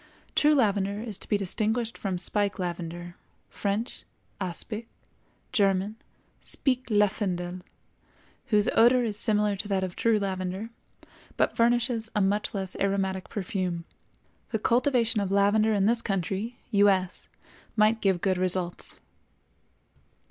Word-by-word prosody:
True 300 Hz, 0 st, +4 dB
lavender 200 Hz, -5 st, +1 dB
is 215 Hz, -3 st, -6 dB
to -, -, -9 dB
be 205 Hz, -, +3 dB
distinguished 220 Hz, +4 st, -1 dB
from 190 Hz, -3 st, -3 dB
spike 200 Hz, +2 st, 0 dB
lavender 175 Hz, -1 st, -5 dB, 0.3 s
(French, 205 Hz, +3 st, -3 dB, 0.4 s
aspic; 210 Hz, +5 st, -3 dB, 0.6 s
German, 195 Hz, 0 st, +2 dB, 0.4 s
Spik 260 Hz, -2 st, +1 dB
Lavendel), 190 Hz, -4 st, 0 dB, 0.9 s
whose 210 Hz, -5 st, +3 dB
odor 245 Hz, +2 st, +5 dB
is 220 Hz, -3 st, -1 dB
similar 210 Hz, -3 st, +2 dB
to 200 Hz, -, -4 dB
that 195 Hz, -2 st, 0 dB
of 185 Hz, -1 st, -4 dB
true 230 Hz, -2 st, +3 dB
lavender, 190 Hz, +2 st, -3 dB, 0.7 s
but -, -, +1 dB
furnishes 235 Hz, -1 st, +2 dB
a -, -, +3 dB
much 205 Hz, +2 st, 0 dB
less 190 Hz, -2 st, -3 dB
aromatic 195 Hz, -1 st, -1 dB
perfume. 180 Hz, -4 st, -3 dB, 0.6 s
The 220 Hz, -, 0 dB
cultivation 235 Hz, -1 st, +2 dB
of 195 Hz, -1 st, -2 dB
lavender 205 Hz, +2 st, +3 dB
in 195 Hz, -1 st, +2 dB
this 230 Hz, +2 st, +3 dB
country 195 Hz, +4 st, -2 dB
(U. 205 Hz, -1 st, +5 dB
S.) 185 Hz, -1 st, -1 dB, 0.5 s
might 215 Hz, +1 st, +4 dB
give 190 Hz, -3 st, +2 dB
good 185 Hz, -2 st, +1 dB
results. 180 Hz, -1 st, -1 dB
200 Hz, 125 wpm, -27 LUFS, 190-220 Hz, 0.9 s, odor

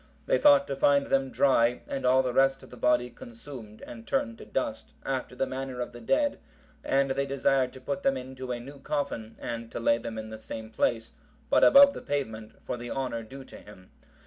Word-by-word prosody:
They -, -, +2 dB
thought 285 Hz, -1 st, +6 dB
to -, -, -4 dB
find 140 Hz, +1 st, +3 dB
them 135 Hz, -1 st, +1 dB
dry 125 Hz, -3 st, +3 dB
and 135 Hz, -2 st, -2 dB
all 130 Hz, +1 st, +5 dB
the 125 Hz, -1 st, -2 dB
rest 135 Hz, +1 st, +3 dB
of -, -, -14 dB
the -, -, -9 dB
body 125 Hz, 0 st, +1 dB
consumed 115 Hz, -2 st, -11 dB
and 115 Hz, -1 st, -10 dB
turned 115 Hz, 0 st, -1 dB
to -, -, -10 dB
dust, -, -, -3 dB
after 130 Hz, -1 st, -3 dB
the 135 Hz, -, 0 dB
manner 130 Hz, -1 st, -5 dB
of 125 Hz, -, -3 dB
the 120 Hz, -, -11 dB
dead, 290 Hz, -, +1 dB, 0.4 s
and 135 Hz, 0 st, +1 dB
they 140 Hz, +1 st, -1 dB
desired 135 Hz, -1 st, +1 dB
to 130 Hz, -, -12 dB
put 185 Hz, +7 st, -3 dB
them 135 Hz, -5 st, +1 dB
into 130 Hz, 0 st, -7 dB
a 120 Hz, -, -3 dB
new 140 Hz, +4 st, -11 dB
coffin, 140 Hz, -6 st, -3 dB
and 115 Hz, -1 st, -5 dB
to -, -, -4 dB
lay 115 Hz, 0 st, +2 dB
them 115 Hz, -1 st, -6 dB
in 110 Hz, 0 st, -6 dB
the 110 Hz, -, -8 dB
same 110 Hz, 0 st, -8 dB
place, 115 Hz, 0 st, 0 dB, 0.4 s
but -, -, +5 dB
above 280 Hz, 0 st, +8 dB
the -, -, -7 dB
pavement, 110 Hz, -7 st, -4 dB
for -, -, -3 dB
the 120 Hz, 0 st, -7 dB
honour 130 Hz, -4 st, -3 dB
due 135 Hz, +5 st, -10 dB
to -, -, -13 dB
him. 95 Hz, -3 st, -15 dB
130 Hz, 220 wpm, -28 LUFS, 115-135 Hz, 0.4 s, above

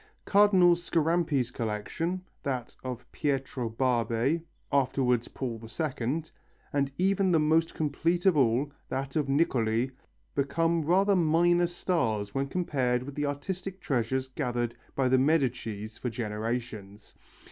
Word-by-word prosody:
Cardinal 195 Hz, -4 st, +6 dB
Scarampi's 165 Hz, -6 st, +1 dB
collection, 125 Hz, -, -3 dB, 0.2 s
that 130 Hz, -4 st, -3 dB
of 125 Hz, -2 st, -5 dB
Pietro 135 Hz, -4 st, -2 dB
Barbe, 120 Hz, +5 st, +1 dB, 0.3 s
afterwards 125 Hz, -3 st, +2 dB
Paul 120 Hz, -4 st, -5 dB
II, 130 Hz, +4 st, -2 dB, 0.5 s
and 140 Hz, -1 st, +1 dB
even 190 Hz, 0 st, +2 dB
the 165 Hz, -, +4 dB
most 160 Hz, +2 st, +2 dB
complete 165 Hz, +4 st, 0 dB
of 190 Hz, -4 st, +5 dB
all, 135 Hz, +1 st, +2 dB, 0.2 s
that 135 Hz, +1 st, -3 dB
of 150 Hz, -3 st, 0 dB
Niccoli, 125 Hz, -4 st, +1 dB, 0.4 s
become 165 Hz, +4 st, +1 dB
rather 190 Hz, +6 st, +3 dB
minor 175 Hz, +1 st, +3 dB
stars 115 Hz, -, -1 dB
when 135 Hz, 0 st, -1 dB
compared 130 Hz, -7 st, 0 dB
with 140 Hz, +2 st, -7 dB
the 145 Hz, +1 st, -1 dB
artistic 185 Hz, +6 st, -4 dB
treasures 130 Hz, -2 st, -1 dB
gathered 120 Hz, -3 st, -2 dB, 0.2 s
by 135 Hz, -2 st, +2 dB
the 130 Hz, 0 st, +4 dB
Medicis 125 Hz, -7 st, 0 dB
for 125 Hz, -, -2 dB
generations. 110 Hz, -2 st, -4 dB
135 Hz, 125 wpm, -29 LUFS, 120-165 Hz, 0.5 s, Cardinal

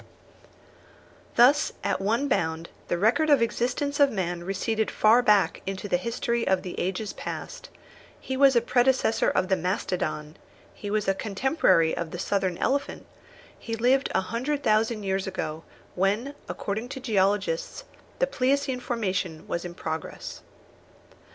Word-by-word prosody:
Thus, 275 Hz, +5 st, +5 dB
at -, -, 0 dB
one 230 Hz, +8 st, +1 dB
bound, 160 Hz, -8 st, -1 dB, 0.2 s
the 175 Hz, -, 0 dB
record 235 Hz, -, +2 dB
of 290 Hz, -, +7 dB
the 230 Hz, -, +3 dB
existence 255 Hz, +5 st, -2 dB
of 285 Hz, -1 st, +6 dB
man 175 Hz, -4 st, -2 dB
receded 215 Hz, +4 st, -1 dB
far 225 Hz, +3 st, +4 dB
back 210 Hz, -5 st, +3 dB
into 195 Hz, +1 st, -4 dB
the 180 Hz, -, +2 dB
history 235 Hz, +3 st, -2 dB
of 190 Hz, -1 st, +2 dB
the 180 Hz, -, -5 dB
ages 195 Hz, +3 st, -2 dB
past; -, -, -7 dB, 0.5 s
he 265 Hz, -, -4 dB
was 270 Hz, -1 st, +5 dB
a 235 Hz, -, +5 dB
predecessor 245 Hz, -1 st, +2 dB
of 185 Hz, -, +1 dB
the 190 Hz, -, +3 dB
mastodon; 175 Hz, -4 st, -2 dB, 0.4 s
he 205 Hz, -, -7 dB
was 210 Hz, -1 st, 0 dB
a 195 Hz, -, +4 dB
contemporary 200 Hz, -, +2 dB
of 170 Hz, -2 st, -4 dB
the 175 Hz, -, -6 dB
southern 190 Hz, -1 st, -1 dB
elephant; 280 Hz, +1 st, -1 dB, 0.5 s
he 225 Hz, -, -4 dB
lived 255 Hz, +4 st, +2 dB
a -, -, +4 dB
hundred 255 Hz, +9 st, -2 dB
thousand 215 Hz, -1 st, +2 dB
years 190 Hz, 0 st, -1 dB
ago, 160 Hz, -4 st, -4 dB, 0.3 s
when, 205 Hz, +9 st, 0 dB, 0.2 s
according 220 Hz, +4 st, -4 dB
to 270 Hz, -, -6 dB
geologists, 200 Hz, -7 st, 0 dB, 0.3 s
the -, -, +3 dB
pleiocene 270 Hz, -, 0 dB
formation 185 Hz, -9 st, -2 dB
was 170 Hz, -, -3 dB
in 175 Hz, -1 st, -7 dB
progress. 160 Hz, -2 st, -6 dB
215 Hz, 150 wpm, -26 LUFS, 185-250 Hz, 0.5 s, of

